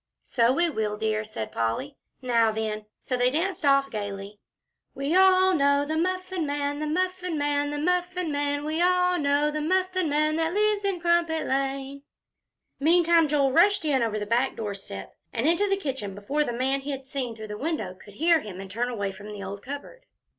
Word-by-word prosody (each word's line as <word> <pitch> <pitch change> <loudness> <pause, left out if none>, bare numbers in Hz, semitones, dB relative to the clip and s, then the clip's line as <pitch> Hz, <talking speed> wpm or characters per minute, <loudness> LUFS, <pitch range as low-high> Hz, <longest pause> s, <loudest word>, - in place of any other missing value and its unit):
"So 235 -1 +2
we 340 +6 +2
will, 215 -8 -2
dear," 215 0 0
said 210 - -6
Polly. 115 - -2 0.3
"Now 230 -3 +3
then!" 215 -1 -3
So 255 - -3
they 250 0 +3
danced 345 +6 -2
off 275 -1 +3
gayly. 205 -1 -5 0.6
"We 280 +5 -1
all 375 0 +6
know 280 -2 +3
the 310 +2 -2
Muffin 370 +1 -1
Man 285 0 -2
the 305 - -2
Muffin 365 +1 -1
Man 290 0 0
the 295 - -3
Muffin 360 +1 0
Man. 285 0 -1
We 315 +2 -1
all 360 0 +3
know 290 +1 +2
the 305 0 -3
Muffin 370 +1 +1
Man, 305 +2 +1
that 325 +2 0
lives 420 -1 +2
in 395 -3 0
Crumpet 340 -2 +2
Lane." 275 +1 -2 0.8
Meantime, 335 +1 +4
Joel 280 -2 +2
rushed 350 +4 +4
in 275 -4 +2
over 220 -2 0
the 210 - -3
back 240 +5 +1
doorstep 195 - -6 0.2
and 240 +4 -1
into 345 +5 +2
the 390 - +2
kitchen 265 - -4
before 275 +10 -1
the 265 - -3
man 265 +3 0
he 280 - -7
had 270 -1 -4
seen 260 -3 -4
through 220 -1 -9
the - - -4
kitchen 210 - -7
window 300 - -2
could 195 +2 -16
hear 330 +4 +4
him 200 -8 -8
and 195 -1 -8
turn 240 +3 -1
away 200 -5 -2
from 205 +2 -10
the 205 -1 -7
old 195 +1 -6
cupboard. 285 - -9
285 Hz, 200 wpm, -26 LUFS, 225-340 Hz, 0.8 s, all